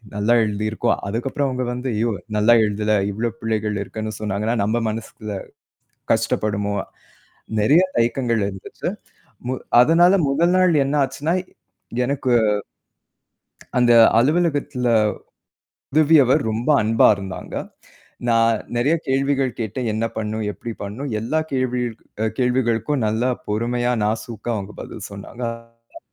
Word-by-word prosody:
நல்லா 105 +4 +2
எழுதி 105 0 -2
இருக்கோம். 115 +2 0
அதுக்கப்புறம் 135 +6 -1
அவுங்க 125 -1 -2
வந்து 125 +1 -4
ஐயோ! 115 +2 +1 0.3
நல்லா 110 +3 +5
எழுதல. 105 +1 0 0.2
இவ்ளோ 115 +3 -2
பிழைகள் 105 -2 -1
இருக்குன்னு 110 +2 -5
சொன்னாங்கனா, 105 +2 -1
நம்ம 110 +3 +1
மனசுல 110 -2 -6 0.8
கஷ்டப்படுவோமா? 100 -1 -1 0.8
நிறைய 150 - +5 0.2
தயக்கங்கள் 115 -2 +1
இருந்துச்சு. 95 -2 -7 0.6
மு 130 - 0 0.3
அதனால 170 +6 +5 0.2
முதல் 170 +6 +2
நாள் 180 -5 +4
என்ன 140 +2 0
ஆச்சுன்னா 145 +5 -2 0.7
எனக்கு 130 -1 -1 1.5
அந்த 120 -1 +4 0.3
அலுவலகத்துல 145 -3 +1 1.1
உதவியவர் 150 -3 +5
ரொம்ப 115 +5 -3
அன்பா 110 +1 +4
இருந்தாங்க. 95 -1 -7 0.7
நான் 115 0 +4 0.2
நிறைய 135 +7 +2
கேள்விகள் 135 0 +1
கேட்டேன். 115 +2 -3
என்ன 110 +1 -1
பண்ணும், 110 0 -2
எப்பிடி 115 +3 -7
பண்ணும்? 115 +8 -5
எல்லா 120 +8 -1
கேள்விகளுக் 125 -4 -2
கேள்விகளுக்கும் 125 +2 +1
அ - - 0
நல்லா 115 +4 +1 0.2
பொறுமையா 120 +3 0
நாசூக்கா 110 +2 -3
அவுங்க 100 0 -6
பதில் 105 - -8
சொன்னாங்க. 115 +2 -8
115 Hz, 115 wpm, -21 LUFS, 110-130 Hz, 1.5 s, நல்லா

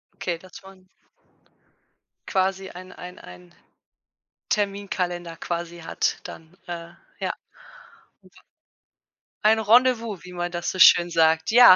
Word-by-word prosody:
Okay, 175 -2 -3
dass 185 +2 -13
man 190 -1 -16 1.4
quasi 190 0 0
ein, 185 +1 -11
ein, 180 0 -10
ein 90 -1 -14 1.0
Terminkalender 185 -4 -2
quasi 170 +1 -4
hat 165 - -1
dann, 165 +3 -11
äh, 170 -1 -6 0.3
ja. - - -2 2.1
Ein 220 +1 +5
Rendezvous, 230 -2 +3
wie 180 - -10
man 175 0 -4
das 175 0 -2
so 185 - -6
schön 175 -1 +8
sagt, 160 +1 +3
ja. 245 -5 +9
180 Hz, 110 wpm, -24 LUFS, 170-195 Hz, 2.1 s, ja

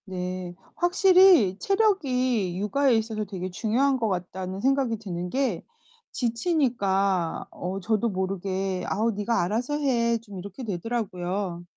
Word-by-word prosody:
네. 180 -1 -5 0.2
확실히 360 - +5
체력이 255 - +1
육아에 265 +5 +2
있어서 220 -1 -2
되게 185 -2 -5
중요한 245 +8 +1
것 230 -3 0
같다는 185 +1 -4
생각이 265 -1 +1
드는 180 -4 -5
게 255 -6 -1 0.5
지치니까 225 - 0
어 185 +2 -4
저도 220 +3 0
모르게 190 -1 -2
"아우 225 +3 +1
니가 210 0 0
알아서 235 +10 -1
해." 235 -5 +1
좀 205 -4 -10
이렇게 200 +6 -8
되더라고요. 190 -3 -3
210 Hz, 280 characters per minute, -26 LUFS, 185-255 Hz, 0.5 s, 확실히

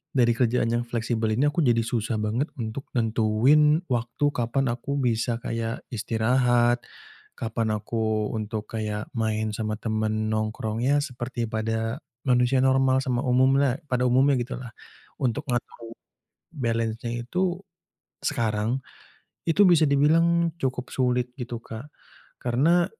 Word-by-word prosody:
dari 120 -3 +4
kerjaan 115 -1 +1
yang 120 0 0
fleksibel 115 -1 -1
ini 135 - +3
aku 150 +3 +1
jadi 120 -5 +3
susah 115 -1 -1
banget 110 +8 -1
untuk 115 +3 -5
nentuin 120 +7 +4
waktu 120 +2 -1
kapan 120 +3 0
aku 140 +4 -4
bisa 120 -2 0
kayak 115 -1 -4
istirahat, 120 +2 +2 0.6
kapan 115 0 -2
aku 110 0 -1
untuk 110 -1 -3
kayak 105 -1 -3
main 110 -2 -1
sama 110 -1 -2
teman 110 -1 -1
nongkrongnya 110 +5 0
seperti 125 -3 -4
pada 110 +3 -2 0.2
manusia 125 0 +3
normal 130 0 +3
sama 125 -2 0
umumlah 130 +1 +3
pada 125 -2 0
umumnya 135 +3 +4
gitulah. 125 -1 -6 0.5
Untuk 130 +4 0
ngatur 120 -2 -4 0.6
balance-nya 115 -3 -2
itu 185 +2 0 0.6
sekarang 115 -1 -1 0.7
itu 200 +5 +5
bisa 170 -3 +5
dibilang 165 +4 +3
cukup 130 -1 -2
sulit 125 -1 0
gitu 120 -2 -5
Kak, 115 +5 -9 0.5
karena 155 +9 +3
120 Hz, 125 wpm, -25 LUFS, 110-130 Hz, 0.7 s, itu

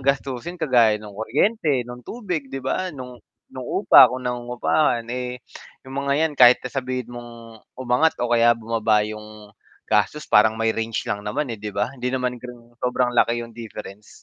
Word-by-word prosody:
gastusin 135 +4 -2
kagaya 120 -9 +3
ng 105 -1 -11
kuryente, 140 - 0
ng 125 0 -9
tubig, 175 - -5
'di 135 -1 -7
ba, 185 +7 -1
no'ng 125 -6 -9 0.3
no'ng - - -7 0.2
upa - - +9
kung 130 0 -6
nangungupahan. 125 +1 0
Eh, 125 0 -5 0.4
'yong 130 - -11
mga 140 0 -1
'yan 155 - -1
kahit 125 0 +9
na 125 - -5
sabihin 125 -2 -4
mong 115 -2 -11 0.2
umangat 130 +5 +1
o 120 0 -1
kaya 120 0 +4
bumaba 110 -2 +1
'yong 105 -1 -10 0.3
gastos 110 +8 0
parang 110 +1 +4
may 110 0 +1
range 115 0 -3
lang 105 - -3
naman, 125 +5 -3
eh, 110 - -8
'di 105 - -5
ba? 105 +6 -2
Hindi 125 -1 -4
naman 125 -2 -2
gano'ng 120 -1 -13
sobrang 125 0 0
laki 120 0 +2
'yong 115 - -13
difference. 105 -3 -10
120 Hz, 175 wpm, -22 LUFS, 115-130 Hz, 0.4 s, upa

